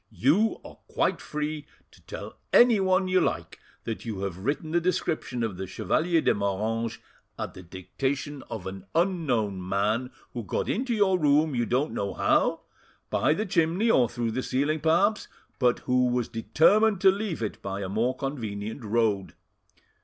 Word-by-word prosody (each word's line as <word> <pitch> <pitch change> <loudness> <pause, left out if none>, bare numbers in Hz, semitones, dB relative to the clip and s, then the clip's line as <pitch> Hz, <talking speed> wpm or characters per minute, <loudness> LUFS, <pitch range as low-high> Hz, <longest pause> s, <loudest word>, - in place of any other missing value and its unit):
"You 180 - +2
are - - -12
quite - - 0
free 150 0 -4 0.2
to - - -20
tell - - -7 0.2
anyone 195 -6 +5
you 185 0 +3
like - - -2 0.2
that 115 - -5
you 110 -5 -5
have 95 -2 -4
written 145 - -2
the 175 +1 +2
description 155 -8 -1
of 105 -5 -3
the 95 0 -5
Chevalier 160 - +1
de - - +3
Moranges 110 +3 -1 0.4
at - - -5
the 90 - -10
dictation 130 - -4
of 105 -5 -6
an 95 0 -7
unknown 125 - 0
man, 105 +6 0 0.2
who 120 - -4
got 95 - -2
into 245 +2 -1
your 190 -3 +3
room 150 0 +3
you 120 -2 0
don't 135 +5 0
know 100 -1 -3
how, - - +2 0.5
by 150 - +2
the 215 - -2
chimney 180 +5 +2
or 120 - +4
through 120 -2 -2
the 130 - -2
ceiling 145 +5 0
perhaps, 175 +8 +2 0.3
but 125 -2 +3
who 125 0 +2
was 125 -1 0
determined 185 - +3
to 190 - +7
leave 195 - -3
it 105 - -4
by 100 0 -4
a 95 - -3
more 115 +6 0
convenient 110 -4 -4
road. 105 -5 0
130 Hz, 170 wpm, -27 LUFS, 105-165 Hz, 0.5 s, to